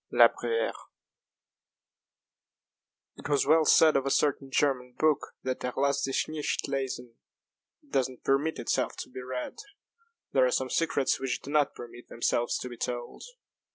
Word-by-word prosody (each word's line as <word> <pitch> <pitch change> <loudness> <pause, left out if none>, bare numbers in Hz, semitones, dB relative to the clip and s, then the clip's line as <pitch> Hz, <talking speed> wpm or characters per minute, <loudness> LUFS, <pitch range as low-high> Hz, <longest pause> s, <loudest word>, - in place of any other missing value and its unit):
La - - +7
Bruyère 465 +2 -3 2.3
IT - - -8
was 145 -2 +2
well 160 +3 +5
said 155 +1 +6
of 135 - +3
a 135 - -1
certain 135 -1 +1
German 130 -3 0
book 155 -2 +3 0.2
that 130 0 -3
"er 125 - -2
lasst 140 +1 +1
sich 135 - -1
nicht 155 -1 -2
lesen" 130 -3 -4 0.7
it 290 - -26
does 130 -1 +1
not 130 - -14
permit 140 +4 +1
itself 120 - -1
to - - -7
be 130 - -7
read. 125 - -5 0.7
There 130 - +4
are - - +1
some 130 +1 -1
secrets 150 -5 +1
which 130 -1 -2
do 140 - -7
not 150 -2 +2
permit 120 0 -11
themselves 120 0 0
to - - -4
be 120 - -9
told. 120 0 -5
135 Hz, 160 wpm, -28 LUFS, 125-145 Hz, 2.3 s, La